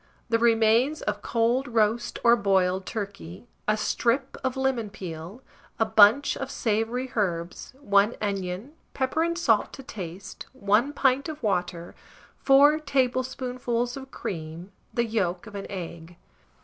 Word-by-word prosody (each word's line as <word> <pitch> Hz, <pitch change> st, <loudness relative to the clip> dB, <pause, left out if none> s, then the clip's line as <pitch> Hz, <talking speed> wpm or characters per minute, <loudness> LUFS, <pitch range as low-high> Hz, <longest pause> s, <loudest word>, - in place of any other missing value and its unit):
The 230 Hz, 0 st, +2 dB
remains 230 Hz, +5 st, +3 dB
of 205 Hz, -1 st, -2 dB
cold 240 Hz, +4 st, +1 dB
roast 230 Hz, 0 st, 0 dB
or 235 Hz, 0 st, +7 dB
boiled 190 Hz, -3 st, +1 dB
turkey; 200 Hz, -3 st, -6 dB, 0.2 s
a 215 Hz, 0 st, +2 dB
strip 245 Hz, +5 st, 0 dB
of 260 Hz, 0 st, -1 dB
lemon 265 Hz, -5 st, 0 dB
peel, 185 Hz, +3 st, -8 dB, 0.3 s
a 225 Hz, -, +2 dB
bunch 220 Hz, +5 st, +5 dB
of 270 Hz, -, -5 dB
savoury 230 Hz, +2 st, -1 dB
herbs, 175 Hz, +1 st, -2 dB
1 205 Hz, -3 st, +3 dB
onion, 200 Hz, +4 st, -3 dB, 0.2 s
pepper 265 Hz, +4 st, 0 dB
and 335 Hz, +1 st, 0 dB
salt 230 Hz, -11 st, +2 dB
to 270 Hz, -, -9 dB
taste, 190 Hz, -5 st, -8 dB
1 240 Hz, +3 st, +1 dB
pint 275 Hz, +1 st, +1 dB
of 310 Hz, -4 st, -8 dB
water, 175 Hz, -4 st, -2 dB, 0.5 s
4 285 Hz, +3 st, +5 dB
tablespoonfuls 255 Hz, -3 st, -1 dB
of 270 Hz, -1 st, -9 dB
cream, 165 Hz, -3 st, -6 dB, 0.2 s
the 235 Hz, -, 0 dB
yolk 190 Hz, -5 st, -1 dB
of 220 Hz, -, -11 dB
an 200 Hz, -1 st, -6 dB
egg. 170 Hz, -2 st, -7 dB
225 Hz, 135 wpm, -26 LUFS, 195-260 Hz, 0.5 s, or